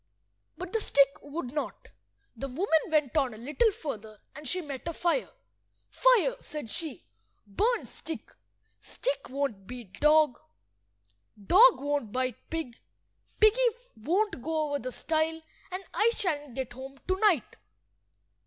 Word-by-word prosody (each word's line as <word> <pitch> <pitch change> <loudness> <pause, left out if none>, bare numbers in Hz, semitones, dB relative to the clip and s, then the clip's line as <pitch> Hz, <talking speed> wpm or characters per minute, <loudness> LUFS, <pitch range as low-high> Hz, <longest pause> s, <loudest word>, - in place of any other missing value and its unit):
But 365 0 -7
the 450 - +1
stick 280 -8 +5
would 285 -3 -6
not. 300 - -4 0.5
The 275 - -4
woman 320 +5 +2
went 305 -5 +1
on 265 -7 +2
a - - -11
little 295 - +2
further, 220 - -7
and 295 +1 -9
she 365 - 0
met 290 -3 -6
a 335 - -2
fire. 345 +9 0 0.6
"Fire," - - +4
said 295 -8 -6
she, 320 0 -3 0.4
"burn 435 - +1
stick. 325 - -8 0.5
Stick - - -3
won't 255 -8 -3
beat 240 -6 -9
dog, 300 -3 +5 1.0
dog 415 - +7
won't 285 -6 -1
bite 255 0 -3
pig, 320 -8 -4 0.6
piggy 435 +3 +6 0.3
won't 355 - 0
go 310 +2 -1
over 285 0 -1
the 255 0 -5
stile, 320 +3 0 0.3
and 370 +1 -5
I 445 - +4
shan't 295 - -2
get 260 -2 -4
home 265 +2 -9
to–night." 375 - +2
300 Hz, 135 wpm, -29 LUFS, 255-365 Hz, 1.0 s, dog